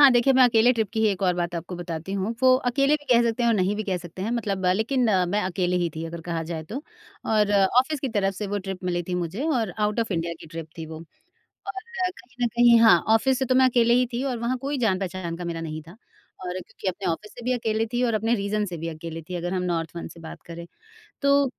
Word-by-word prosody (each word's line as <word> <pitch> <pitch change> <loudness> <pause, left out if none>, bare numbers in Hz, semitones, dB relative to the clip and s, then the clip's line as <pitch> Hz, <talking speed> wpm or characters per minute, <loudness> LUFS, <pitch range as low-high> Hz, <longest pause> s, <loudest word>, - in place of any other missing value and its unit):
हाँ, 280 -2 +9
देखिए 240 +3 +4
मैं 260 0 +6
अकेले 240 0 +5
ट्रिप 220 -3 -1
की 220 - -1
ही 220 - +4
एक 195 -2 -2
और 180 -1 +3
बात 175 0 -2
आपको 175 +2 -5
बताती 170 +1 -5
हूँ। 200 +4 -1
वो 255 0 +7 0.2
अकेले 275 +4 +3
भी 290 - -17
कह 235 0 +6
सकते 235 +1 0
हैं 235 - +3
और 230 - +3
नहीं 190 +2 +1
भी 215 - -2
कह 190 -2 -1
सकते 175 +2 -8
हैं 220 - -2
मतलब 200 -6 -1
लेकिन 245 +4 +1 0.2
मैं 205 +3 +1
अकेले 180 0 0
ही 175 -1 +1
थी 160 +1 -4
अगर 170 +1 -6
कहा 165 -1 -3
जाए 160 -2 -3
तो। 240 - -6 0.4
और 210 -2 +2 0.3
ऑफिस 290 +2 -3
की 275 - -1
तरफ 200 -4 0
से 210 +2 -4
वो 205 +1 -2
ट्रिप 190 -1 -6
मिली 175 -1 0
थी 180 +1 -4
मुझे 180 - -3
और 240 - +1
आउट 210 +2 +1
ऑफ 225 -2 -2
इंडिया 170 0 -1
की - - -11
ट्रिप 165 0 -7
थी 160 - -5
वो। 160 0 -8 0.7
और 390 -1 -4 0.3
कहीं 250 -7 -6
न 235 - +2
कहीं 235 0 +5
हाँ, 225 -1 +7 0.2
ऑफिस 260 +3 +2
से 265 - +1
तो 255 0 +1
मैं 260 - +6
अकेले 235 -1 +4
ही 250 0 +3
थी 240 +2 -2
और 255 -3 -2
वहाँ 235 +3 -1
कोई 275 +2 -3
जान-पहचान 185 -6 -1
का 180 - -6
मेरा 170 -1 -3
नहीं 155 -1 -5
था 170 - -11
और 185 -4 -11
क्योंकि 190 - -11
अपने 185 +1 -4
ऑफिस 210 +6 -7
से 240 - -11
भी 250 - +1
अकेले 225 -2 0
थी 245 - 0
और 230 - +1
अपने 225 +2 +1
रीजन 210 0 -1
से 180 - -5
भी 165 +1 -4
अकेले 165 0 -6
थी 180 +3 -8
अगर 175 +1 -3
हम 180 - -1
नॉर्थ 165 -3 -1
वन 170 - -5
से 170 - -13
बात 160 - -10
करें 170 0 -8 0.6
तो 280 0 +4
205 Hz, 265 wpm, -25 LUFS, 175-240 Hz, 0.7 s, हाँ